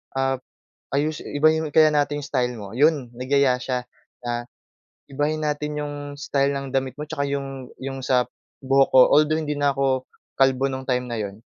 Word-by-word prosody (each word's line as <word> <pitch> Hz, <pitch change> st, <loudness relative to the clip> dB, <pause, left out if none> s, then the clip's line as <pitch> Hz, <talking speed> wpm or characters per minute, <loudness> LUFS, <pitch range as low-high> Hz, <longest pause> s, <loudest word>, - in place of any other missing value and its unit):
ap 135 Hz, -1 st, 0 dB, 0.5 s
ayusi 150 Hz, +2 st, -1 dB, 0.2 s
ibahin 155 Hz, 0 st, +3 dB
kaya 155 Hz, -1 st, +8 dB
natin 145 Hz, 0 st, +1 dB
yung 145 Hz, -, -6 dB
style 125 Hz, -2 st, 0 dB
mo?" 100 Hz, -1 st, -8 dB
Yon, 145 Hz, -4 st, +2 dB
nagyaya 130 Hz, +1 st, +2 dB
siya 125 Hz, -2 st, -2 dB, 0.4 s
na, 120 Hz, 0 st, -1 dB, 0.7 s
"Ibahin 150 Hz, +3 st, -1 dB
natin 150 Hz, 0 st, -2 dB
'yong 145 Hz, 0 st, -5 dB, 0.2 s
style 140 Hz, 0 st, +1 dB
ng 135 Hz, -1 st, -6 dB
damit 130 Hz, -1 st, 0 dB
mo 150 Hz, -, -5 dB
tsaka 145 Hz, -3 st, -2 dB
'yong" 135 Hz, -2 st, -4 dB, 0.2 s
'yong 135 Hz, -1 st, -5 dB
sa 125 Hz, -1 st, +4 dB, 0.4 s
buhok 135 Hz, 0 st, +4 dB
ko, 130 Hz, -, +9 dB
although 155 Hz, +1 st, +4 dB
hindi 150 Hz, -2 st, -2 dB
na 145 Hz, 0 st, +3 dB
'ko 135 Hz, -2 st, +1 dB, 0.4 s
kalbo 135 Hz, 0 st, +3 dB
no'ng 130 Hz, 0 st, -5 dB
time 125 Hz, 0 st, 0 dB
na 115 Hz, -, -2 dB
'yon. 100 Hz, +1 st, -6 dB
135 Hz, 175 wpm, -23 LUFS, 130-150 Hz, 0.7 s, ko